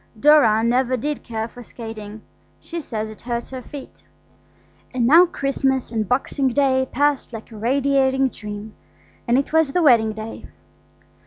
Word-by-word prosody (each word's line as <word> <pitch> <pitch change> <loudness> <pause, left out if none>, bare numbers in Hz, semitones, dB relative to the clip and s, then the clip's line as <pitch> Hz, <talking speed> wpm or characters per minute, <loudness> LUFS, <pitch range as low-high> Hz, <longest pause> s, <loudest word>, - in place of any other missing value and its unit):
Dora 230 -6 +5
never 250 +2 +1
did 295 +4 -3
care 225 -2 -4
for 245 - -13
skating; 220 -2 -9 0.4
she 340 0 -6
says 220 -6 -4
it 215 - -13
hurts 240 0 -4
her 260 -1 -6
feet. 275 +2 -11 0.9
And 245 -2 +1
now 330 +8 +7
Christmas 270 -5 -1
and 220 -4 -2
Boxing 270 +2 0
Day 260 0 +2
passed 285 -2 0
like 225 +1 -9
a - - -10
radiating 265 +2 +2
dream, 210 -1 -8 0.5
and 240 +1 +3
it 280 +2 -1
was 320 -4 +3
the 355 - +2
wedding 230 -6 +5
day. 220 +1 -8
255 Hz, 155 wpm, -21 LUFS, 225-275 Hz, 0.9 s, now